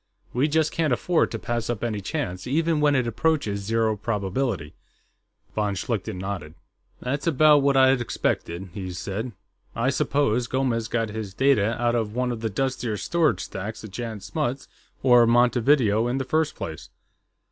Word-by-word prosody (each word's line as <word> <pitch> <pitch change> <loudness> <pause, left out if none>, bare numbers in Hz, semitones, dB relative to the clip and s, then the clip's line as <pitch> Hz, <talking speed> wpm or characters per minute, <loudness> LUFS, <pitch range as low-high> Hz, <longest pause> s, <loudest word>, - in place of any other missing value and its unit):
We 130 +5 +2
just 155 0 +1
can't 160 -4 0
afford 165 +7 +2
to 115 - -4
pass 120 0 -3
up 120 -3 -2
any 110 -3 -2
chance, 100 - -4
even 160 +3 +1
when 145 -1 +4
it 130 -2 +2
approaches 115 -3 0
zero 110 +1 +1
probability." 105 - -2 0.8
Von 105 -2 0
Schlichten 95 -2 -3
nodded. 90 -5 -5 0.5
"That's 140 +5 -2
about 155 -1 +6
what 140 -1 +3
I'd 130 -1 +5
expected," 95 -5 -2
he 95 -2 -5
said. 105 +7 -4 0.4
"I 125 +4 +1
suppose 135 -4 +1
Gomes 125 -4 0
got 115 -1 -1
his 105 -2 -6
data 115 -5 +2
out 120 0 +2
of 110 -2 -1
one 125 0 0
of 115 -2 -5
the 110 - -1
dustier 125 -1 -2
storage 155 - +1
stacks 100 +5 -6
at 110 - -9
Jan 110 -1 -5
Smuts 135 - -3 0.4
or 125 -3 +6
Montevideo, 120 -1 +3
in 125 +2 -1
the 135 - -2
first 155 +2 0
place.... 80 -1 -7
120 Hz, 165 wpm, -25 LUFS, 105-135 Hz, 0.8 s, about